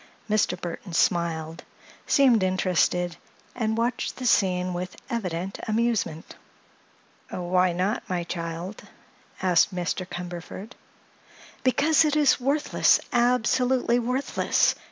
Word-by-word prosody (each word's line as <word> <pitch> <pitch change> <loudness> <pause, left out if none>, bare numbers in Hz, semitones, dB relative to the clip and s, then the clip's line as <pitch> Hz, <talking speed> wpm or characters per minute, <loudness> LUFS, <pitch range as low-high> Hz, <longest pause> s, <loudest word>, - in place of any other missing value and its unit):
Mr. 210 -4 +1
Burthon 175 0 -6
smiled, 165 -1 0 0.4
seemed 255 -7 +4
interested, 180 -2 +1 0.4
and 220 -2 -1
watched 240 +2 -1
the 255 - -6
scene 185 -5 +2
with 180 +1 -5 0.2
evident 190 -4 -3
amusement. 220 -8 -1 0.9
"Why 180 0 +1
not, 185 +6 -2
my 180 -2 -1
child?" 170 +3 -5 0.6
asked 180 +1 +3
Mr. 180 +1 -3
Cumberford. 180 +4 -7 0.9
"Because 295 +5 +4
it 305 -1 +1
is 295 -3 +4
worthless—absolutely 250 -3 +2
worthless!" 250 +3 +1
185 Hz, 95 wpm, -25 LUFS, 175-240 Hz, 0.9 s, seemed